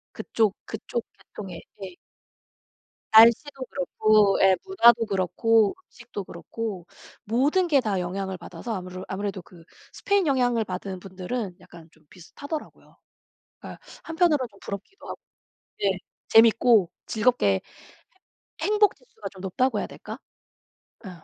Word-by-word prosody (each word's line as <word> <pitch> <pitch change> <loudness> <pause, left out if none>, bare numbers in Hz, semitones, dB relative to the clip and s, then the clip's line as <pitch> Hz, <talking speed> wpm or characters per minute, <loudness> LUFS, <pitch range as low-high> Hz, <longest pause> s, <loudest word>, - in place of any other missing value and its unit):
그쪽 215 -3 0
그쪽 225 +1 -4
계통의 190 -5 -10 0.2
예. 185 -2 -8 1.2
날씨도 235 +5 +6
그렇고 215 -7 +2
예, 190 -1 +6
문화도 235 - +5
그렇고 215 - +2
음식도 235 -4 -8
그렇고 190 +1 -6 0.4
모든 285 - +2
게 290 - +4
다 205 -5 -1
영향을 190 +1 -4
받아서 230 +5 -7
아무르 185 -1 -6
아무래도 200 0 -4
그 170 0 -17 0.3
스페인 400 -2 +1
영향을 245 -4 +2
받은 185 0 -5
분들은 190 +1 -5
약간 175 -3 -15
좀 155 - -26
비슷하더라고요. 285 - -9 0.6
그러니까 - - -10 0.2
한편으로는 325 -6 +1
좀 200 - -21
부럽기도 200 - -8
하고 - - -7 0.6
네. 195 -2 +1 0.3
재밌고 225 -3 +5 0.2
즐겁게 245 +3 +1
해 95 -1 +2 1.0
행복지수가 425 +3 0
좀 190 - -15
높다고 225 +8 0
해야 - - -3
될까? - - -9 0.9
예. - - -6
215 Hz, 295 characters per minute, -25 LUFS, 190-250 Hz, 1.2 s, 날씨도